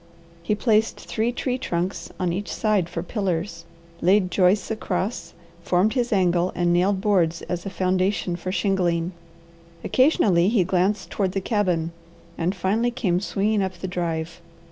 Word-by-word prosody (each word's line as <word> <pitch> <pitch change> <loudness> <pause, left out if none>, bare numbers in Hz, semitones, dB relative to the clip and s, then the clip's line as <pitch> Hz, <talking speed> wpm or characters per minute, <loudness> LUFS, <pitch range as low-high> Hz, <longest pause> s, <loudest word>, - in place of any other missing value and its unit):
He 190 +5 0
placed 220 0 +1
three 225 +2 -1
tree 250 +1 -2
trunks 180 -4 -3
on 180 -2 0
each 200 +3 -4
side 210 -6 +1
for 170 -1 -4
pillars, 180 -3 -3 0.4
laid 185 +1 +3
joists 190 +2 +2
across, 195 -3 -3 0.3
formed 180 +5 +2
his 245 -2 0
angle, 180 -3 +2
and 175 -1 +2
nailed 190 +2 +2
boards 175 -5 +1
as 180 +1 -4
a - - -2
foundation 185 -1 0
for 185 +1 -4
shingling. 180 -4 0 0.7
Occasionally 200 - +3
he 215 -5 +3
glanced 190 +2 0
toward 190 -3 -1
the 195 - 0
cabin, 180 -6 0 0.4
and 175 +4 -1
finally 205 +6 +1
came 195 -8 0
swinging 205 +1 0
up 190 -1 -1
the 190 - -5
drive. 170 -1 -3
185 Hz, 150 wpm, -24 LUFS, 175-210 Hz, 0.7 s, laid